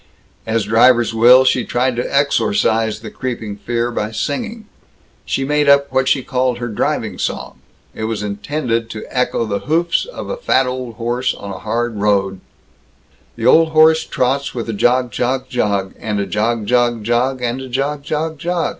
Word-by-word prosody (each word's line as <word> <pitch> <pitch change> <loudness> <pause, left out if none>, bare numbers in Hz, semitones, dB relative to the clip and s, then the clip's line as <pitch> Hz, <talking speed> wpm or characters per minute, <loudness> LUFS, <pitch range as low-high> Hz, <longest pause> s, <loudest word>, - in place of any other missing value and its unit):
As 110 -1 +1
drivers 120 +1 +4
will, 125 +3 +6
she 130 -1 +2
tried 125 +2 0
to 120 - -3
exorcise 115 - +1
the 110 - -8
creeping 115 -5 -5
fear 120 +2 -2
by 105 -2 -2
singing. 220 - -4 0.6
She 135 - -1
made 150 0 +2
up 140 -1 +4
what 130 0 +1
she 135 - +2
called 125 -1 0
her 120 0 -4
driving 105 - -2
song. - - -4 0.3
It 110 - -4
was 110 -2 -3
intended 115 +3 -2
to 110 - -7
echo 125 -2 0
the 100 -2 -2
hoofs 165 +2 +1
of - - -8
a - - -4
fat 135 - +2
old 125 -2 -5
horse 120 +2 -1
on 100 - -8
a 95 - -7
hard 120 -1 -2
road: 100 -2 0 0.9
The - - -4
old 160 -1 +5
horse 160 0 +5
trots 135 +2 -1
with 120 -2 -4
a - - -1
jog, 125 +3 +2
jog, 130 +1 -2
jog, 100 -5 -1
And 105 -2 -2
a 100 - -1
jog, 110 +1 -1
jog, 120 -1 +1
jog; 125 +3 0
and 120 +2 -2
a 130 - -8
jog, 140 +3 -2
jog, 155 +1 -3
jog. 175 +1 -1
125 Hz, 180 wpm, -18 LUFS, 115-135 Hz, 0.9 s, will